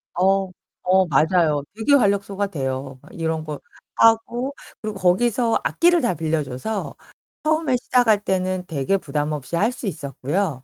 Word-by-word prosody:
어. 190 +1 +2 0.3
어, 185 +1 +4
맞아요. 155 0 +2
되게 225 +6 +1
활력소가 200 -4 +2
돼요. 135 -5 -4
막 - - -17
이런 160 -1 -2
거 150 -2 -5 0.4
하고 235 +4 +3 0.3
그리고 215 -1 -4
거기서 230 +6 +2
악기를 345 0 +3
다 240 -7 +1
빌려줘서 155 - -3 0.5
처음에 310 -4 +1
시작할 235 -4 +2
때는 185 -1 -1
되게 155 +5 0
부담 150 -3 -3
없이 150 +2 -4
할 215 +7 +2
수 245 -4 -6
있었고요. 140 0 -3
185 Hz, 300 characters per minute, -22 LUFS, 155-225 Hz, 0.5 s, 어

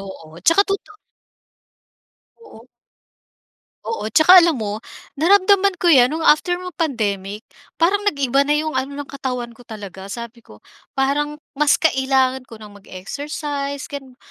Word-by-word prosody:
Oo. 165 -4 -12
Tsaka 330 - +4
toto 400 +2 -4 1.5
Oo. 240 - -16 1.2
Oo. 450 - -4
Tsaka 335 - +7
alam 335 -3 +2
mo, 215 -2 -4 0.4
naramdaman 395 +2 +4
ko 345 -1 +3
'yan 250 -4 +6
no'ng 320 +3 -4
after 330 +4 +3
mag-pandemic. 230 - -3 0.3
Parang 370 +5 +2
nag-iba 275 -5 +1
na 290 +1 +2
'yong 310 +1 -2
ano 265 +2 -3
ng 290 - -5
katawan 250 -4 -5
ko 235 - -20
talaga. 200 -4 -10
Sabi 235 +2 -8
ko - - -18 0.3
parang 290 +2 0 0.2
mas 295 +1 +3
kailangan 265 -3 +1
ko 230 - -11
nang 210 -1 -13
mag-exercise, 280 +8 -6
gano'n. 270 -3 -8
275 Hz, 135 wpm, -20 LUFS, 230-320 Hz, 1.5 s, Tsaka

